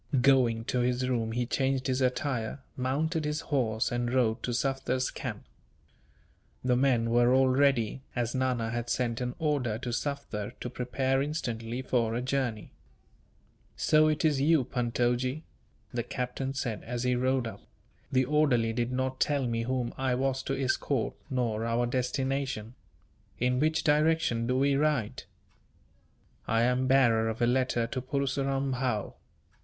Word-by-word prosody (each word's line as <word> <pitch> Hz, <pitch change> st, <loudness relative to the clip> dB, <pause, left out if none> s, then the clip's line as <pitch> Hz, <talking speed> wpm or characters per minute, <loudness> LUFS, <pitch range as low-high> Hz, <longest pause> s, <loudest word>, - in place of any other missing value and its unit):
Going 125 Hz, -4 st, +3 dB
to 125 Hz, -, -1 dB
his 125 Hz, +1 st, +1 dB
room 115 Hz, -3 st, -1 dB
he 120 Hz, +1 st, 0 dB
changed 135 Hz, +1 st, 0 dB
his 130 Hz, 0 st, 0 dB
attire, 125 Hz, -2 st, -1 dB, 0.2 s
mounted 155 Hz, +6 st, -1 dB
his 150 Hz, +1 st, -2 dB
horse, 115 Hz, -7 st, 0 dB
and 120 Hz, 0 st, -1 dB
rode 120 Hz, -3 st, +1 dB
to 125 Hz, -, -2 dB
Sufder's 130 Hz, 0 st, -1 dB
camp. -, -, -6 dB, 1.2 s
The 125 Hz, -1 st, +2 dB
men 120 Hz, -3 st, +2 dB
were 120 Hz, +1 st, +4 dB
all 130 Hz, 0 st, +4 dB
ready, 130 Hz, -3 st, +2 dB
as 120 Hz, -2 st, -1 dB
Nana 125 Hz, -3 st, 0 dB
had 120 Hz, 0 st, -3 dB
sent 120 Hz, -1 st, -1 dB
an 125 Hz, 0 st, -3 dB
order 145 Hz, -9 st, 0 dB
to 125 Hz, +1 st, -5 dB
Sufder 130 Hz, -6 st, -3 dB
to 125 Hz, -, -4 dB
prepare 130 Hz, +2 st, 0 dB
instantly 120 Hz, -5 st, -3 dB
for 115 Hz, -3 st, 0 dB
a 120 Hz, -, -1 dB
journey. 130 Hz, -5 st, -2 dB, 1.0 s
"So 155 Hz, 0 st, +4 dB
it 155 Hz, +1 st, +1 dB
is 145 Hz, -3 st, +2 dB
you, 155 Hz, -1 st, +4 dB
Puntojee!" 125 Hz, +4 st, -1 dB, 0.5 s
the 120 Hz, -, 0 dB
captain 125 Hz, +3 st, -4 dB
said, 120 Hz, -6 st, -3 dB
as 120 Hz, +1 st, -3 dB
he 125 Hz, 0 st, +2 dB
rode 130 Hz, 0 st, +1 dB
up; 105 Hz, -3 st, -7 dB, 0.5 s
"the 130 Hz, -1 st, +3 dB
orderly 130 Hz, -6 st, +2 dB
did 120 Hz, +1 st, -1 dB
not 130 Hz, 0 st, -2 dB
tell 145 Hz, -3 st, +1 dB
me 115 Hz, -1 st, -1 dB
whom 125 Hz, 0 st, -2 dB
I 130 Hz, -2 st, +1 dB
was 135 Hz, +1 st, 0 dB
to 135 Hz, 0 st, -1 dB
escort, 130 Hz, -1 st, 0 dB, 0.2 s
nor 120 Hz, -5 st, -1 dB
our 115 Hz, +1 st, +1 dB
destination. 130 Hz, -2 st, -2 dB, 0.6 s
In 125 Hz, +1 st, +1 dB
which 155 Hz, +2 st, +1 dB
direction 150 Hz, -6 st, +2 dB
do 125 Hz, +1 st, +1 dB
we 140 Hz, +1 st, +3 dB
ride?" 145 Hz, -6 st, 0 dB, 1.2 s
"I 115 Hz, +1 st, +2 dB
am 125 Hz, +1 st, +2 dB
bearer 120 Hz, -4 st, +4 dB
of 110 Hz, -, -4 dB
a 120 Hz, -, +3 dB
letter 125 Hz, -1 st, +1 dB
to 125 Hz, +2 st, -4 dB
Purseram 135 Hz, +1 st, -1 dB
Bhow." 125 Hz, -5 st, -1 dB
125 Hz, 155 wpm, -29 LUFS, 120-135 Hz, 1.2 s, were